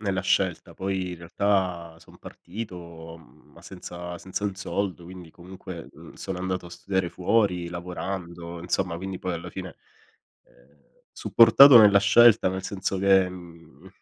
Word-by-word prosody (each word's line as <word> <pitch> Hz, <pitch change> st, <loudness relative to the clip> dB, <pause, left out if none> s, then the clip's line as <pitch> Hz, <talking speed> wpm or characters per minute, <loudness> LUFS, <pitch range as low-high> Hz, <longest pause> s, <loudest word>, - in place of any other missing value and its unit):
nella 100 Hz, -3 st, -2 dB
scelta, 95 Hz, -2 st, -1 dB
poi 95 Hz, -1 st, -3 dB
in -, -, -8 dB
realtà 90 Hz, -2 st, -2 dB
son -, -, -19 dB
partito, 85 Hz, -4 st, -10 dB
mhmm, 80 Hz, -, -22 dB
ma -, -, -17 dB
senza 90 Hz, -1 st, -9 dB
senza 95 Hz, +3 st, -5 dB
un 100 Hz, -2 st, -2 dB
soldo, 95 Hz, -2 st, -4 dB
quindi 90 Hz, -2 st, -12 dB
comunque, 90 Hz, 0 st, -11 dB
mhmm, -, -, -15 dB
sono 95 Hz, -2 st, -7 dB
andato 95 Hz, -1 st, -4 dB
a -, -, -13 dB
studiare 95 Hz, 0 st, -3 dB
fuori, 90 Hz, -3 st, 0 dB
lavorando, 85 Hz, -1 st, -7 dB
insomma, 90 Hz, 0 st, -2 dB
quindi 95 Hz, 0 st, -6 dB
poi, 90 Hz, -, -4 dB
alla 85 Hz, +1 st, -6 dB
fine 95 Hz, -1 st, -9 dB, 0.7 s
ehm, 70 Hz, +4 st, -27 dB, 0.3 s
supportato 120 Hz, +3 st, +7 dB
nella 100 Hz, -2 st, +7 dB
scelta 110 Hz, 0 st, +5 dB
nel 95 Hz, 0 st, -5 dB
senso 95 Hz, 0 st, -4 dB
che, 95 Hz, -1 st, +3 dB
mhmm 85 Hz, -2 st, -14 dB
90 Hz, 150 wpm, -25 LUFS, 85-95 Hz, 0.7 s, supportato